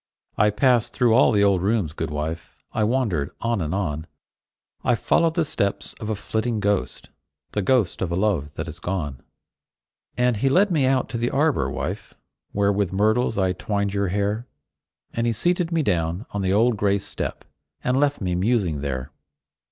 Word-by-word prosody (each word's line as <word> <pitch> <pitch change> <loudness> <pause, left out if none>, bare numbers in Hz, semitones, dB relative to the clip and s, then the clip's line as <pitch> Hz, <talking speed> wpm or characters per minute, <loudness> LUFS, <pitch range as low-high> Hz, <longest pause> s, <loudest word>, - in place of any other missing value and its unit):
I 105 +1 +4
passed 120 +2 +2
through 120 -3 +3
all 125 - +5
the 100 -3 +3
old 100 -3 +3
rooms, 100 -6 0
good - - -3
wife; 75 +3 -5 0.2
I 110 - +1
wandered 105 - 0
on 115 -3 0
and 80 -2 -2
on; 80 -5 -2 0.8
I - - +3
followed 165 +8 +2
the 165 -3 +2
steps 100 -9 -2
of 110 - -5
a 110 - 0
flitting 110 +2 -2
ghost, 100 -1 -1 0.4
The 105 - -1
ghost 115 -2 +1
of 90 -3 -1
a - - 0
love 90 -7 0
that 80 - -4
is 85 - -8
gone. 75 -9 -3 1.0
And 125 -2 +2
he 135 +6 +2
led 190 +7 +4
me 145 -6 +3
out 130 -1 +2
to 115 0 -3
the 120 +1 +1
arbor, 150 +1 +1
wife, - - -5 0.4
Where 100 0 +2
with 100 -3 0
myrtles 110 +4 +2
I 95 -2 +2
twined 100 +1 -2
your 100 -1 0
hair; 105 +5 -1 0.7
And 115 0 0
he 115 - +2
seated 175 - 0
me 165 -2 +1
down 85 - 0
on 100 - -2
the 95 -1 +1
old 115 +3 +3
stone 100 -1 +3
step, 100 - -5 0.4
And 125 +1 +2
left 145 -3 +1
me 90 -2 -1
musing 90 - +1
there. 70 -1 -4
105 Hz, 185 wpm, -23 LUFS, 90-120 Hz, 1.0 s, all